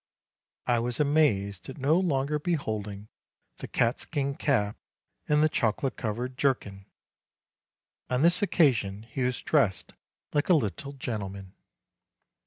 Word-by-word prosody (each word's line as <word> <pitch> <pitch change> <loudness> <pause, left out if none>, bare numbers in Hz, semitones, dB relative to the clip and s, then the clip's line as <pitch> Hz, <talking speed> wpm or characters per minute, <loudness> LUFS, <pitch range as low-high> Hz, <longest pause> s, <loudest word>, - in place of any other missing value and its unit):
I 120 -1 +2
was 120 +3 -2
amazed 110 - +2
at 135 - -8
no 140 +2 +2
longer 150 -4 0
beholding 110 - -2
180 105 - -16
MARCH - - -52
the - - -6
catskin 140 +4 0
cap 110 -8 0 0.5
and 150 0 +4
the - - +6
chocolate 130 -1 0
colored 125 +3 -4
jerkin: 100 -8 -1 1.2
on 125 +3 +1
this 175 +2 +4
occasion 115 - +2
he 115 +4 -6
was 125 0 -1
dressed 120 -12 +1 0.4
like 145 +3 +1
a 180 - +7
little 140 +1 -2
gentleman. 100 -7 -5
125 Hz, 130 wpm, -28 LUFS, 105-145 Hz, 1.2 s, a